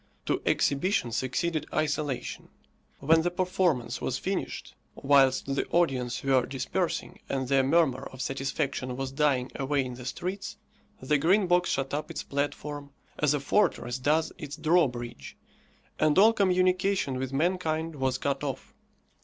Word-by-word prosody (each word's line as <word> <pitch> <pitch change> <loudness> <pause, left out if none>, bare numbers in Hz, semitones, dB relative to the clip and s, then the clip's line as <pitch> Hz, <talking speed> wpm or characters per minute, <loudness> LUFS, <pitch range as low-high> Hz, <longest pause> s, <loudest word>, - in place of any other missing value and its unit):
To - - 0
exhibition 140 - +1
succeeded 140 +7 -1
isolation. 150 -3 -2 0.5
When 160 +4 +4
the 175 - +1
performance 175 -7 0
was - - -1
finished, - - -4 0.2
whilst 135 -1 +3
the 140 - -1
audience 130 -7 0
were 130 -2 +3
dispersing, 135 -1 -3
and 130 -2 -1
their 135 0 +4
murmur 135 -1 +2
of 130 - -12
satisfaction 135 -1 -2
was 135 -1 -3
dying 135 -3 +1
away 135 0 0
in 125 - -5
the 125 0 -9
streets, 185 +8 -4 0.4
the 145 +3 +1
Green 190 +7 +3
Box 180 0 +2
shut 135 0 -1
up 150 +1 -2
its - - -5
platform, 145 0 -3 0.3
as 150 -1 +3
a - - -1
fortress 130 - +1
does 155 +4 +1
its 145 -2 -6
drawbridge, 125 - 0 0.6
and 155 -1 +3
all 220 +4 +7
communication 185 - +2
with 130 0 -3
mankind 160 +1 0
was 130 -2 0
cut 140 0 -2
off. 135 -3 -5
140 Hz, 145 wpm, -28 LUFS, 130-165 Hz, 0.6 s, all